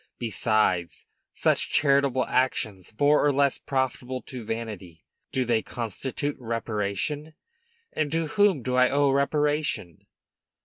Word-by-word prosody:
Besides, 110 -6 0 0.3
such - - +1
charitable 140 -3 +3
actions, 110 -7 -1
more 145 +1 +4
or 145 - +4
less 140 0 +2
profitable 130 -1 -2
to 125 -3 -8
vanity, 105 -8 -6 0.3
do 130 -1 0
they 115 -2 +2
constitute 130 +6 -4
reparation? 115 +6 -3 0.6
and 150 -2 -1
to 165 +1 +1
whom 190 - +2
do 125 - -2
I 125 0 +5
owe 140 0 +3
reparation? 145 - 0
130 Hz, 120 wpm, -26 LUFS, 110-145 Hz, 0.6 s, I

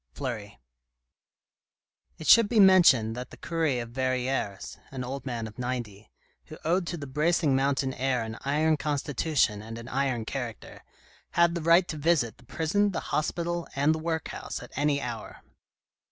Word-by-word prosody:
— - - -39
Fkury 110 -5 -5 1.6
It 155 - -8
should 230 +2 +7
be 230 - +2
mentioned 165 - +6
that 125 +1 -6
the - - -13
cure 160 -6 -1
of 115 - -12
Verrieres, 130 -5 -2
an 130 -2 -5
old 135 +2 -6
man 120 -3 -3
of 110 +2 -10
ninety, 120 -5 -4 0.4
who - - -10
owed 175 +2 +1
to 175 - -3
the 145 - -6
bracing 150 +1 +1
mountain 135 0 +1
air 125 -2 0
an 110 0 -6
iron 155 +3 +2
constitution 145 -6 0
and 115 +1 -8
an 115 0 -9
iron 130 -3 -1
character, 120 -3 -6 0.5
had 170 0 +4
the 170 - -3
right 170 +3 +5
to 155 - -5
visit 145 -8 +1
the - - -19
prison, 200 - 0
the - - -1
hospital 170 +3 -1
and 145 +3 +3
the 160 - -3
workhouse 160 -5 -4
at 125 - -12
any 145 0 +1
hour. 120 -5 -7
140 Hz, 170 wpm, -27 LUFS, 120-160 Hz, 1.6 s, should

